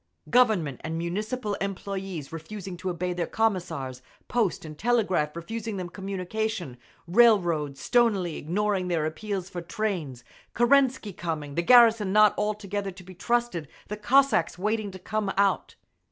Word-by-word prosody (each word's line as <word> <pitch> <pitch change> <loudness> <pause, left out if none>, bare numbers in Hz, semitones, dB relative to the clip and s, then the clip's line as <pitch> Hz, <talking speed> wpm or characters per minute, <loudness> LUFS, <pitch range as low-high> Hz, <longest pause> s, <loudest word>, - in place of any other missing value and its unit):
Government 210 - +3
and 160 +1 -3
Municipal 210 +7 -3
employees 195 -5 -4
refusing 185 +3 -7
to 185 +1 -4
obey 180 +1 -2
their 175 -2 -2
Commissars, 165 - -1 0.3
post 225 -9 0
and 155 -1 -8
telegraph 190 -8 +1
refusing 220 +5 -5
them 180 -2 -4
communication, 195 - -4 0.3
railroads 170 - +3
stonily 210 -9 +2
ignoring 190 +3 -1
their 165 -3 0
appeals 190 +3 -4
for 180 -2 -6
trains, 170 - -3 0.3
Kerensky 250 -3 +3
coming, 155 -4 -4
the 170 - +1
garrison 225 -1 +6
not 215 0 +6
altogether 205 -1 -2
to 185 0 -11
be 185 +1 -12
trusted, 235 - -1 0.2
the 210 - -3
Cossacks 255 0 +3
waiting 210 +2 -1
to 190 - -9
come 205 +2 -2
out…. 200 0 +1
195 Hz, 140 wpm, -27 LUFS, 170-215 Hz, 0.3 s, garrison